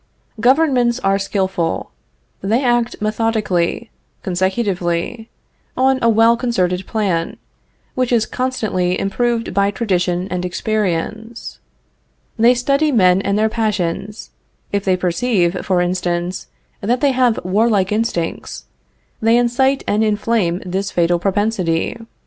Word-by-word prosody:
Governments 250 Hz, -1 st, +3 dB
are 195 Hz, 0 st, +2 dB
skillful. 190 Hz, -4 st, -2 dB, 0.5 s
They 225 Hz, +7 st, +1 dB
act 240 Hz, -1 st, +1 dB
methodically, 215 Hz, -2 st, -1 dB, 0.3 s
consecutively, 190 Hz, +2 st, -1 dB, 0.5 s
on 265 Hz, 0 st, +3 dB
a 230 Hz, -, +3 dB
well 225 Hz, +1 st, +5 dB
concerted 190 Hz, -7 st, -1 dB
plan, 190 Hz, -7 st, -1 dB, 0.6 s
which 255 Hz, -1 st, -1 dB
is 230 Hz, -3 st, +3 dB
constantly 205 Hz, -8 st, -1 dB
improved 230 Hz, +3 st, -1 dB
by 200 Hz, +1 st, +2 dB
tradition 185 Hz, -4 st, -1 dB
and 180 Hz, -1 st, -2 dB
experience. 215 Hz, +4 st, -3 dB, 0.8 s
They 240 Hz, +2 st, +5 dB
study 275 Hz, +5 st, +1 dB
men 185 Hz, -6 st, +4 dB
and 200 Hz, +1 st, 0 dB
their 215 Hz, +1 st, +3 dB
passions. 210 Hz, -2 st, -3 dB, 0.4 s
If 200 Hz, -1 st, -1 dB
they 185 Hz, -1 st, +2 dB
perceive, 180 Hz, 0 st, 0 dB
for 185 Hz, -2 st, +1 dB
instance, 175 Hz, 0 st, -2 dB, 0.3 s
that 240 Hz, +5 st, 0 dB
they 280 Hz, +1 st, +3 dB
have 250 Hz, -3 st, +2 dB
warlike 200 Hz, 0 st, +2 dB
instincts, 210 Hz, -6 st, -2 dB, 0.6 s
they 225 Hz, +1 st, +4 dB
incite 265 Hz, +3 st, +2 dB
and 210 Hz, +2 st, +2 dB
inflame 210 Hz, -4 st, 0 dB
this 190 Hz, +2 st, -2 dB
fatal 175 Hz, 0 st, +1 dB
propensity. 190 Hz, -3 st, 0 dB
210 Hz, 115 wpm, -18 LUFS, 180-235 Hz, 0.8 s, well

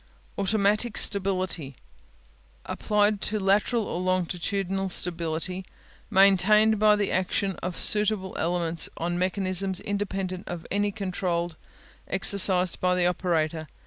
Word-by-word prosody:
Automatic 210 Hz, +3 st, +1 dB
Stability 185 Hz, -8 st, 0 dB, 0.9 s
Applied 210 Hz, -1 st, +1 dB
to 215 Hz, 0 st, -1 dB
lateral 205 Hz, +4 st, +1 dB
or 175 Hz, -, -4 dB
longitudinal 185 Hz, +1 st, -1 dB
stability 175 Hz, +1 st, 0 dB, 0.5 s
maintained 200 Hz, +3 st, +4 dB
by 210 Hz, 0 st, +5 dB
the 205 Hz, -1 st, -1 dB
action 190 Hz, +2 st, -1 dB
of 180 Hz, -1 st, -5 dB
suitable 210 Hz, -2 st, +1 dB
elements 170 Hz, -1 st, -1 dB
on 175 Hz, +1 st, -2 dB
mechanisms 185 Hz, 0 st, -1 dB
independent 195 Hz, -2 st, -4 dB
of 170 Hz, -2 st, -6 dB
any 205 Hz, +1 st, 0 dB
control 180 Hz, -4 st, -3 dB, 0.6 s
exercised 185 Hz, -2 st, +3 dB
by 180 Hz, 0 st, +2 dB
the 180 Hz, -1 st, +1 dB
operator. 165 Hz, -3 st, -1 dB
190 Hz, 110 wpm, -26 LUFS, 180-200 Hz, 0.9 s, by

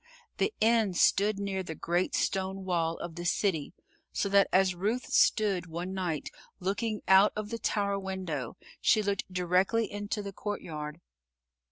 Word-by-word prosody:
The -, -, +1 dB
inn 220 Hz, -4 st, +3 dB
stood 205 Hz, +4 st, +3 dB
near 200 Hz, -1 st, -2 dB
the 160 Hz, -3 st, -6 dB
great 175 Hz, +3 st, 0 dB
stone 190 Hz, 0 st, -1 dB
wall 165 Hz, -2 st, 0 dB
of 170 Hz, -1 st, -6 dB
the 175 Hz, +1 st, -6 dB
city, 175 Hz, -3 st, 0 dB, 0.4 s
so 200 Hz, -, -1 dB
that 200 Hz, 0 st, +5 dB
as 190 Hz, 0 st, +4 dB
Ruth 215 Hz, +8 st, -1 dB
stood, 195 Hz, -5 st, +3 dB
one 175 Hz, +3 st, -5 dB
night, 175 Hz, -6 st, -3 dB, 0.3 s
looking 205 Hz, +3 st, -2 dB
out 190 Hz, +2 st, +7 dB
of 210 Hz, 0 st, -4 dB
the 230 Hz, -, -3 dB
tower 200 Hz, -2 st, 0 dB
window, 185 Hz, -10 st, -4 dB, 0.2 s
she 215 Hz, -, +4 dB
looked 200 Hz, -2 st, -2 dB
directly 185 Hz, +5 st, +1 dB
into 205 Hz, +1 st, -3 dB
the 200 Hz, -1 st, -6 dB
courtyard. 160 Hz, -6 st, -5 dB
190 Hz, 155 wpm, -30 LUFS, 175-205 Hz, 0.4 s, out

